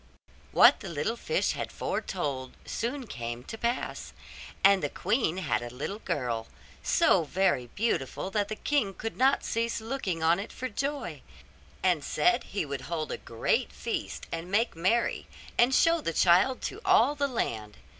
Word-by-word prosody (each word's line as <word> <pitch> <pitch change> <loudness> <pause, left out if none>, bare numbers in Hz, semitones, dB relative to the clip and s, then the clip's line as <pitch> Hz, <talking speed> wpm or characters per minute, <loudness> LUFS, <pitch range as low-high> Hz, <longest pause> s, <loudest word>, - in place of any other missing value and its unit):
What - - +7
the 195 - -7
little 170 +8 -1
fish 470 - 0
had - - -4
foretold 140 -8 -3
soon 255 +3 -3
came 120 - -5
to 225 - -7
pass; 235 +2 -3 0.5
and 195 0 +6
the 145 - -1
queen 205 - 0
had 160 -9 0
a 120 - -5
little 145 - -5
girl, 125 - -2 0.3
so 320 - +4
very 160 -6 +1
beautiful 195 - -1
that 205 0 0
the 215 - -4
king 215 -7 0
could 225 0 -5
not 265 +2 +3
cease 230 0 -1
looking 220 -8 -3
on 165 +3 +4
it 205 - -6
for 255 - -5
joy, 250 - -3 0.6
and 175 -6 +2
said 235 - +2
he 195 -5 -2
would 140 -2 -4
hold 160 -1 -3
a - - -2
great 115 -1 0
feast - - -4
and 165 +2 -4
make 220 +3 +1
merry, 190 +8 +1 0.3
and 250 +2 +4
show 330 0 +4
the 165 - -2
child 185 +11 +4
to 420 - -4
all 290 - +5
the 285 -1 0
land. 110 - -3
195 Hz, 165 wpm, -29 LUFS, 150-235 Hz, 0.6 s, What